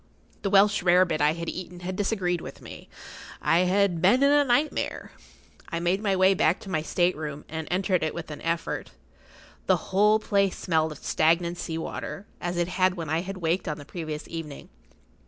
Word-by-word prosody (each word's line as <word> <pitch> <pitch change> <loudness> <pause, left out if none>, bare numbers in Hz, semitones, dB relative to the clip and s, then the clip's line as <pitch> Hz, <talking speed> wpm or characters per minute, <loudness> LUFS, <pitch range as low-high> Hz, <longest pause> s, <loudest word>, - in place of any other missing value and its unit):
The 200 - -1
Welsh 200 +1 +4
rare 180 +1 +5
bit 155 -4 -2
I 150 +1 +4
had 170 0 -6
eaten 180 -1 -6
had 185 +1 -4
disagreed 185 -4 -1
with - - -9
me. - - -11 0.5
I 165 - +3
had 190 -3 +2
been 240 +10 +4
in 280 - +5
a 290 0 +5
nightmare. 285 +4 0 0.6
I 170 - -2
made 175 +4 0
my 200 -3 +1
way 190 +1 +5
back 180 -1 +2
to 195 - -8
my 155 -3 0
state 175 +3 +1
room, 150 -1 -6
and 160 0 -5
entered 185 0 +1
it 155 -1 -2
with 165 -2 -6
an 150 - -8
effort. 165 0 -2 0.8
The - - +4 0.2
whole 210 +2 +5
place 200 -3 +1
smelled 160 -3 0
of 150 - -8
stagnant 170 +2 +1
sea 160 -2 -4
water, 195 +4 -5 0.2
as 175 0 -3
it 175 -1 +1
had 185 0 +1
when 165 -4 -5
I 160 +1 +1
had 190 +1 -6
waked 170 +1 -1
on 150 - -2
the 145 - -10
previous 155 -2 -6
evening. 160 -4 -7
175 Hz, 200 wpm, -26 LUFS, 160-195 Hz, 0.8 s, rare